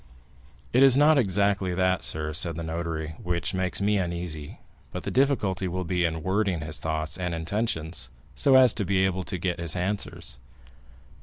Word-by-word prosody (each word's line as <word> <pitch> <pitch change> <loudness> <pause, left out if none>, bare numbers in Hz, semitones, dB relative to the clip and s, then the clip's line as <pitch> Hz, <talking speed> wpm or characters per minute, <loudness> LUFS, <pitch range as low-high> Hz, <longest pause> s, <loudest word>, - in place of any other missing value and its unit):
"It 125 - +5
is 135 -1 +7
not 150 0 +6
exactly 100 -3 +1
that, 95 0 +1
sir," 75 0 -2
said 85 +1 -1
the 85 - -5
notary, 80 -1 -3
"which 90 0 -2
makes 95 -1 -1
me 105 0 +2
uneasy, 85 -4 -4 0.3
but - - -6
the - - -3
difficulty 110 -9 +1
will 90 +1 -3
be 90 0 0
in 80 -1 -2
wording 95 -2 0
his 75 0 -3
thoughts 80 +1 -3
and 90 -2 -2
intentions, 80 - -2 0.2
so 130 - +3
as 130 -3 +7
to 105 - -2
be 95 0 +2
able 95 0 -1
to 90 +3 -4
get 90 0 -2
his 85 -1 +1
answers." 90 -9 -3
90 Hz, 175 wpm, -26 LUFS, 80-100 Hz, 0.3 s, is